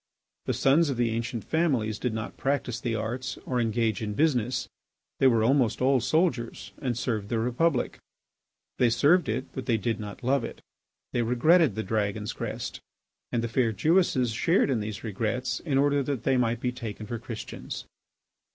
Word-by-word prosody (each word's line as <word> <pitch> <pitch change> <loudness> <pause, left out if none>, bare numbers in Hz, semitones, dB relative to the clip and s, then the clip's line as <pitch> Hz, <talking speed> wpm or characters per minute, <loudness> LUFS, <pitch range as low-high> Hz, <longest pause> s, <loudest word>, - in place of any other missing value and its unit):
The - - +1
sons 145 +4 +4
of 135 - -2
the 120 -1 +1
ancient 115 0 -3
families 130 -11 0
did 125 - -1
not 110 0 -5
practise 135 -4 -1
the 115 -2 -1
arts 120 +4 -3
or 125 -2 0
engage 115 -1 0
in 105 -1 -3
business. 125 -4 +1 0.5
They 135 - +6
were 115 -3 +4
almost 125 -1 +3
all 130 0 +3
soldiers 155 -5 0
and 125 -5 -1
served 110 -5 -2
the 115 - 0
Republic. 125 +5 0 0.8
They 125 - +5
served 150 +6 +4
it, 125 +5 -1
but 130 - -6
they 115 - +3
did 115 +2 -1
not 105 +3 -7
love 135 0 +2
it; - - -6 0.5
they 120 - +1
regretted 125 - +4
the 110 - -2
dragon's 105 0 -1
crest. - - -5 0.5
And 115 - 0
the - - 0
fair 115 0 +1
Jewesses 150 - +2
shared 155 - +2
in 120 - +1
these 105 -1 -5
regrets 115 +4 -2
in 145 -5 -1
order 145 +1 +3
that 140 -2 -3
they 135 - +2
might 120 -2 +1
be 125 - 0
taken 110 -3 -6
for 115 +2 -4
Christians. 115 -1 -7
120 Hz, 180 wpm, -27 LUFS, 110-135 Hz, 0.8 s, They